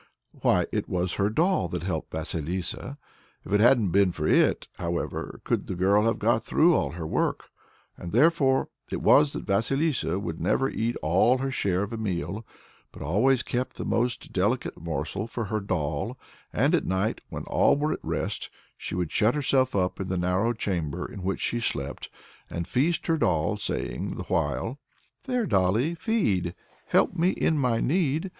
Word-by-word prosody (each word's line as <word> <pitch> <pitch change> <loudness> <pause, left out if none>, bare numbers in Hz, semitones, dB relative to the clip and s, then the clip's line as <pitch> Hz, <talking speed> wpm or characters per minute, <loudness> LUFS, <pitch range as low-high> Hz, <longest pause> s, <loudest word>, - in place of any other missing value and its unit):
Why, - - +2
it - - -2
was 90 -1 -1
her 100 - +3
doll 165 - +2
that 85 0 -4
helped 85 -4 -3
Vasilissa. 85 - -4 0.5
If - - -5
it 105 - +5
hadn't 110 -4 +5
been 100 0 +4
for 80 -3 -4
it, - - +3
however 85 -1 -3
could - - -1
the 95 - -3
girl 100 +4 +3
have 115 - +2
got 115 +1 +2
through 170 +2 +4
all - - 0
her 85 -1 -5
work? - - -1 0.5
And 85 - -7
therefore 135 +1 +3 0.2
it - - -2
was 145 0 +5
that - - -5
Vasilissa 115 - +1
would 85 -5 -4
never 105 +9 +2
eat 115 -2 -1
all 95 +11 +4
her 135 +1 -2
share 95 -6 0
of 105 +3 -5
a - - -3
meal, 95 -1 -3 0.5
but - - -9
always 120 - +2
kept 125 +1 -3
the - - -5
most 120 +1 -1
delicate 105 +7 0
morsel 85 +5 -3
for 115 -1 -4
her 110 +2 -1
doll; 95 - -2 0.3
and - - +2
at - - +2
night, 95 +4 0
when - - -5
all - - +3
were 150 +1 0
at - - -5
rest, - - -3 0.3
she - - -5
would 90 -3 -2
shut 110 +4 +3
herself 135 -4 +2
up 90 -2 0
in 95 - -3
the 95 - -1
narrow 90 +6 +1
chamber 90 -10 -2
in 100 - -8
which 95 +1 -2
she 120 - 0
slept, 70 -10 -3 0.4
and 85 0 -4
feast 160 +6 +1
her 165 - +2
doll, 85 - +1
saying 105 - -3
the - - -4
while: 130 +5 -1 0.5
"There, 250 -3 0
dolly, 105 - +2
feed; 135 - 0 0.3
help - - +3
me 170 +2 +3
in 160 -4 +1
my 125 -4 +2
need! 160 +2 +1
105 Hz, 180 wpm, -26 LUFS, 90-130 Hz, 0.5 s, it